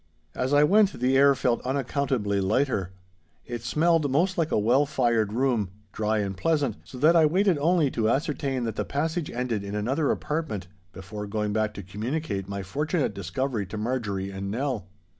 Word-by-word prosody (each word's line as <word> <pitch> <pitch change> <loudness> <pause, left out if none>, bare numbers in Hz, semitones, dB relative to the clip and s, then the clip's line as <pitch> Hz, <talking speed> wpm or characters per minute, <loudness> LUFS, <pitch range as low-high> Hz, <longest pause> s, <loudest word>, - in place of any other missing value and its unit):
As 130 +2 -2
I 145 0 +5
went 200 +5 +4
the 125 +2 +1
air 140 +1 +6
felt 125 -2 0
unaccountably 130 -6 0
lighter. 100 -2 0 0.5
It 120 -1 -5
smelled 155 +5 +2
most 175 +8 +2
like 165 -2 0
a - - +2
well 125 +7 +3
fired 120 -7 +1
room, 120 -4 +1 0.2
dry 110 0 0
and 100 -1 -3
pleasant, 145 - 0
so 130 - -10
that 155 +6 +5
I 160 -2 +6
waited 185 0 +2
only 160 -2 +3
to 110 -1 0
ascertain 135 -1 -1
that 115 -2 -3
the - - 0
passage 160 +3 -2
ended 120 -4 -2
in 100 +1 -5
another 135 +8 0
apartment 150 - -2 0.3
before 105 +3 -7
going 105 0 -2
back 110 0 0
to 100 - -6
communicate 105 - -3
my 100 -1 -4
fortunate 150 - -1
discovery 100 +3 -2
to 105 - -6
Marjorie 105 -4 -2
and 95 0 -5
Nell. 120 -3 -2
125 Hz, 180 wpm, -26 LUFS, 105-145 Hz, 0.5 s, air